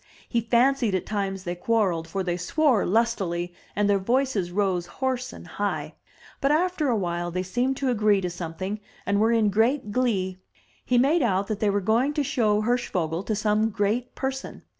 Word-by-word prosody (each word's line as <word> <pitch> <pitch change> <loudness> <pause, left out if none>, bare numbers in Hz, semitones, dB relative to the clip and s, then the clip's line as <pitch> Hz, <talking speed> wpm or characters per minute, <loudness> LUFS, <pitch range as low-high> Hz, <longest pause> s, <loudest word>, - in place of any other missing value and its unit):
He 235 - 0
fancied 235 -1 +2
at 185 - -2
times 195 -3 -2
they 175 - -3
quarrelled, 180 -3 0
for 190 +3 -2
they 175 -1 -1
swore 240 - +2
lustily 180 -5 0 0.2
and 205 0 +2
their 200 -1 +3
voices 230 -4 0
rose 185 -3 0
hoarse 255 +3 -2
and - - -11
high; - - -3 0.5
but 275 - +2
after 335 -1 +1
a 245 - +2
while 175 -3 -2
they 180 +1 -2
seemed 245 +8 -1
to 270 -2 0
agree 210 -3 +3
to 180 - -2
something, 180 +4 -5 0.3
and 200 0 +1
were 220 +2 +3
in 220 -3 +3
great 225 +2 +1
glee. 195 -6 0 0.4
He 250 - +1
made 290 +7 +4
out 200 -5 +1
that 215 -2 -2
they 210 - +2
were 200 0 +1
going 235 +9 +2
to 295 - +1
show 215 -6 +1
Hirschvogel 185 -8 -1
to 215 +2 -2
some 215 +1 +1
great 215 +4 -1
person. 265 0 -4
210 Hz, 185 wpm, -25 LUFS, 185-245 Hz, 0.5 s, made